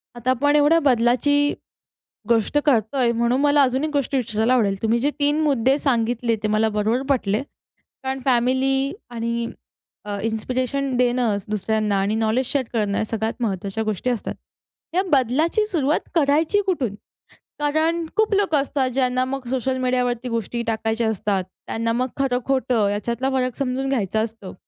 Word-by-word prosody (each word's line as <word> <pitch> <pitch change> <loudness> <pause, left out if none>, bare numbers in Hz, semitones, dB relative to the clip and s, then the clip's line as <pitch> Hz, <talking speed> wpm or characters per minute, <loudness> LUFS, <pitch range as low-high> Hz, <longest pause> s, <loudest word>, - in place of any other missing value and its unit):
आता 240 +1 -3
आपण 290 +4 +2
एवढ्या 300 +3 +5
बदलाची 275 +2 +3 0.8
गोष्ट 230 +3 +1
करतोय 240 -1 +2
म्हणून 235 +3 +1
मला 290 0 +4
अजून 260 +2 +1
1 310 - -1
गोष्ट 280 -1 -1
विचारायला 230 -1 +1
आवडेल. 205 -6 +2
तुम्ही 225 +1 +2
जे 280 +5 +1
3 290 +2 +2
मुद्दे 270 -3 +2
सांगितले 235 -3 0
ते 215 - 0
मला 215 +1 +2
बरोबर 215 +4 0
पटले. 225 -5 +1 0.6
कारण 265 0 -2
फॅमिली 265 +2 +2 0.2
आणि 235 0 -2 0.6
अ, 205 -1 -4
इन्स्पिरेशन 255 +4 -1
देणं 245 -3 +2
दुसऱ्यांना 215 0 0
आणि 200 +2 0
नॉलेज 220 +3 +1
शेअर 275 +1 0
करणं 210 -4 0
या - - 0
सगळ्यात 220 0 -2
महत्त्वाच्या 200 0 -2
गोष्टी 215 +3 -1
असतात. 240 -4 -3 0.6
या 370 - +3
बदलाची 290 - +2
सुरुवात 310 -7 0
करायची 315 +5 +3
कुठून. 275 - -1 0.6
कारण 315 +3 +1
खूप 435 -1 +2
लोकं 390 -7 +2
असतात 275 -1 0
ज्यांना 255 0 +1
मग 260 0 -5
सोशल 260 0 -1
मीडियावरती 250 -1 0
गोष्टी 230 0 -2
टाकायच्या 225 0 0
असतात, 200 -2 -1 0.2
त्यांना 230 0 -1
मग 250 +2 0
खरं-खोटं 255 -4 +1
याच्यातला 235 +6 -2
फरक 255 -2 -1
समजून 270 0 -2
घ्यायचा 220 -5 0
असतो 220 -4 -5
250 Hz, 150 wpm, -22 LUFS, 225-275 Hz, 0.8 s, एवढ्या